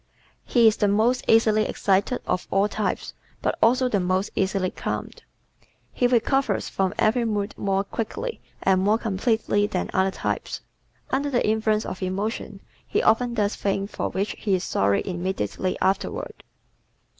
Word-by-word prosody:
He 235 Hz, -2 st, +4 dB
is 215 Hz, -, +4 dB
the 205 Hz, -, +2 dB
most 220 Hz, +5 st, +2 dB
easily 220 Hz, -1 st, +4 dB
excited 200 Hz, +5 st, +1 dB
of 180 Hz, -, -1 dB
all 195 Hz, +2 st, +3 dB
types 210 Hz, -2 st, -3 dB, 0.3 s
but -, -, 0 dB
also 255 Hz, +3 st, +4 dB
the 210 Hz, -5 st, +1 dB
most 185 Hz, +2 st, 0 dB
easily 190 Hz, -1 st, 0 dB
calmed. -, -, -5 dB, 0.7 s
He 245 Hz, -, +2 dB
recovers 245 Hz, -1 st, +1 dB
from 190 Hz, 0 st, -1 dB
every 235 Hz, +3 st, +2 dB
mood 210 Hz, -2 st, -1 dB
more 195 Hz, -1 st, 0 dB
quickly 230 Hz, -, -4 dB, 0.2 s
and 190 Hz, -1 st, +3 dB
more 210 Hz, +3 st, +3 dB
completely 220 Hz, -1 st, 0 dB
than 185 Hz, -, -3 dB
other 190 Hz, 0 st, +3 dB
types. -, -, -3 dB, 0.5 s
Under 280 Hz, +2 st, 0 dB
the 245 Hz, -5 st, +1 dB
influence 215 Hz, 0 st, +1 dB
of 185 Hz, -, -6 dB
emotion 195 Hz, +4 st, -3 dB, 0.3 s
he -, -, 0 dB
often 235 Hz, +2 st, +3 dB
does 210 Hz, -2 st, +1 dB
things 195 Hz, 0 st, -2 dB
for -, -, -2 dB
which 200 Hz, +2 st, -2 dB
he 200 Hz, -3 st, +1 dB
is 180 Hz, -, -2 dB
sorry 100 Hz, -, +1 dB
immediately 185 Hz, -, -2 dB
afterward. 315 Hz, -, -1 dB
205 Hz, 155 wpm, -24 LUFS, 190-225 Hz, 0.7 s, He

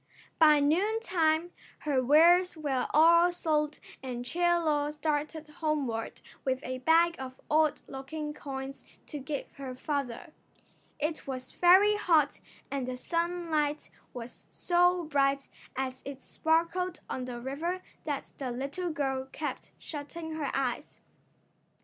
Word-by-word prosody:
By 305 Hz, -2 st, +7 dB
noontime 345 Hz, 0 st, +2 dB, 0.3 s
her 275 Hz, -4 st, +1 dB
wares 340 Hz, +6 st, +5 dB
were 275 Hz, -5 st, -1 dB
all 335 Hz, +3 st, +6 dB
sold 305 Hz, -3 st, 0 dB, 0.2 s
and 245 Hz, -2 st, -5 dB
Chie 345 Hz, +7 st, -4 dB, 0.2 s
Lo 300 Hz, -3 st, +1 dB
started 300 Hz, +1 st, -2 dB
homeward 295 Hz, -7 st, -2 dB, 0.2 s
with 260 Hz, -1 st, 0 dB
a 255 Hz, 0 st, -4 dB
bag 330 Hz, +5 st, +4 dB
of 260 Hz, 0 st, -7 dB
odd 310 Hz, -1 st, +3 dB
looking 295 Hz, +3 st, -5 dB
coins 270 Hz, -1 st, -6 dB, 0.2 s
to 295 Hz, -, -6 dB
give 280 Hz, +1 st, -5 dB
her 265 Hz, -2 st, -6 dB
father. 280 Hz, +2 st, -3 dB, 0.7 s
It 310 Hz, 0 st, -2 dB
was 255 Hz, -1 st, -5 dB
very 390 Hz, +4 st, +6 dB
hot 320 Hz, -8 st, +3 dB, 0.3 s
and 275 Hz, -3 st, -2 dB
the 255 Hz, 0 st, -3 dB
sunlight 335 Hz, -2 st, -1 dB, 0.2 s
was 240 Hz, -1 st, -9 dB
so 355 Hz, 0 st, +2 dB
bright 275 Hz, -2 st, +1 dB, 0.3 s
as 260 Hz, 0 st, -3 dB
it 275 Hz, -1 st, -8 dB
sparkled 335 Hz, +3 st, 0 dB
on 255 Hz, -, -3 dB
the 245 Hz, -1 st, -6 dB
river 320 Hz, +9 st, -3 dB, 0.2 s
that 290 Hz, -3 st, -4 dB
the 265 Hz, -3 st, -3 dB
little 280 Hz, +9 st, -3 dB
girl 270 Hz, -4 st, -2 dB
kept 300 Hz, -, -5 dB
shutting 320 Hz, +2 st, -7 dB
her 300 Hz, -3 st, -2 dB
eyes. 265 Hz, +1 st, -2 dB
300 Hz, 130 wpm, -30 LUFS, 270-335 Hz, 0.7 s, By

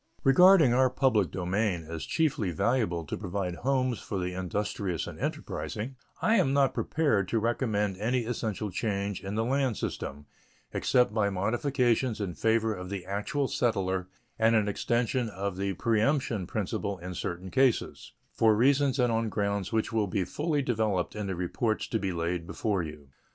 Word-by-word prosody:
Regarding 160 Hz, -1 st, +7 dB
our 130 Hz, +1 st, +4 dB
public 125 Hz, -, +2 dB
domain 90 Hz, +1 st, -1 dB
as 80 Hz, -1 st, -5 dB
chiefly 145 Hz, -, +1 dB
valuable 90 Hz, -2 st, 0 dB
to -, -, -4 dB
provide 90 Hz, -3 st, -3 dB
homes 130 Hz, -2 st, 0 dB
for 100 Hz, -, -5 dB
the 90 Hz, 0 st, -2 dB
industrious 95 Hz, -1 st, -2 dB
and -, -, -8 dB
enterprising, 125 Hz, +6 st, -4 dB, 0.3 s
I 225 Hz, +1 st, +4 dB
am 135 Hz, -8 st, +2 dB
not 140 Hz, -1 st, +3 dB
prepared 125 Hz, -, +1 dB
to 115 Hz, -, 0 dB
recommend 105 Hz, -4 st, 0 dB
any 120 Hz, +4 st, 0 dB
essential 110 Hz, -3 st, -3 dB
change 100 Hz, 0 st, -2 dB
in 100 Hz, +1 st, -4 dB
the 110 Hz, +1 st, 0 dB
land 130 Hz, -2 st, +1 dB
system, 70 Hz, +2 st, -5 dB, 0.5 s
except 125 Hz, -4 st, +2 dB
by 105 Hz, -2 st, +2 dB
modifications 120 Hz, +4 st, +1 dB
in 100 Hz, -4 st, -3 dB
favor 110 Hz, +6 st, +1 dB
of 90 Hz, -2 st, -7 dB
the 95 Hz, -2 st, -5 dB
actual 105 Hz, +8 st, -1 dB
settler 95 Hz, -7 st, 0 dB, 0.3 s
and 115 Hz, +1 st, +4 dB
an 110 Hz, -2 st, +3 dB
extension 120 Hz, +3 st, 0 dB
of 100 Hz, -1 st, -4 dB
the 100 Hz, +1 st, -1 dB
preemption 115 Hz, -, +1 dB
principle 100 Hz, -1 st, -2 dB
in 90 Hz, +1 st, -7 dB
certain 90 Hz, +2 st, -5 dB
cases, 130 Hz, -3 st, +1 dB, 0.2 s
for 110 Hz, -1 st, +4 dB
reasons 135 Hz, +3 st, +3 dB
and 125 Hz, -2 st, +2 dB
on 115 Hz, 0 st, 0 dB
grounds 100 Hz, -2 st, -1 dB
which 110 Hz, 0 st, 0 dB
will 110 Hz, -2 st, +1 dB
be 100 Hz, 0 st, 0 dB
fully 150 Hz, -, -1 dB
developed 110 Hz, -8 st, 0 dB
in 105 Hz, -1 st, -3 dB
the 95 Hz, -, -2 dB
reports 110 Hz, +6 st, -1 dB
to 110 Hz, -, 0 dB
be 95 Hz, -2 st, -1 dB
laid 85 Hz, 0 st, -2 dB
before 100 Hz, -1 st, -1 dB
you. 75 Hz, -3 st, -8 dB
105 Hz, 165 wpm, -29 LUFS, 95-125 Hz, 0.5 s, Regarding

